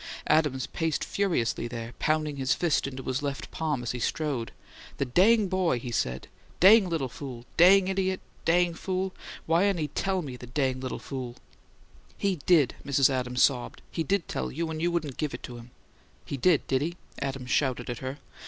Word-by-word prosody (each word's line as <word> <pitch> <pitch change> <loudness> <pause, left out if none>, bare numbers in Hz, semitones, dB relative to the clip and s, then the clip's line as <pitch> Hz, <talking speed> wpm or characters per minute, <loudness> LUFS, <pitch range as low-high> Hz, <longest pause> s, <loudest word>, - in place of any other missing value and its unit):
Adams 150 -4 +2
paced 160 -2 -2
furiously 165 - 0
there, 115 0 -6
pounding 155 -2 0
his 130 -2 +1
fist 165 -5 +1
into 130 -1 -6
his 130 +3 -2
left 140 -2 -4
palm 150 -6 -2
as 120 - -2
he 125 - -4
strode. 135 -2 -2 0.5
"The 140 - 0
dang 200 - +4
boy!" 180 -7 +1
he 120 0 -6
said. 65 - -2 0.3
"Dang 195 +1 +7
little 160 -6 -1
fool! 125 -1 -8
Dang 185 +2 +7
idiot! 190 -1 0 0.2
Dang 175 +1 +3
fool! 185 +2 -2 0.3
Whyn't 180 +4 +3
he 150 -2 -2
TELL 190 +4 -1
me, 130 -4 -6
the 125 - -10
dang 130 0 0
little 130 -1 -4
fool?" 130 -3 -6 0.8
"He 195 -2 0
DID!" 155 -8 +5
Mrs. 140 -1 +3
Adams 125 -1 +1
sobbed. 125 -4 0
"He - - -2
DID 185 +3 0
tell - - -3
you, 160 +3 -3
and 155 0 -4
you 175 - +2
wouldn't 160 -6 -2
GIVE 150 -2 -2
it - - -11
to 120 - -7
him." 120 +1 -12 0.6
"He - - -4
DID, 155 +3 +3
did 130 0 +1
he?" 170 +4 -3 0.2
Adams 135 -2 -3
shouted 130 -4 +1
at 120 -2 -4
her. 130 +1 -5
145 Hz, 190 wpm, -28 LUFS, 130-175 Hz, 0.8 s, Dang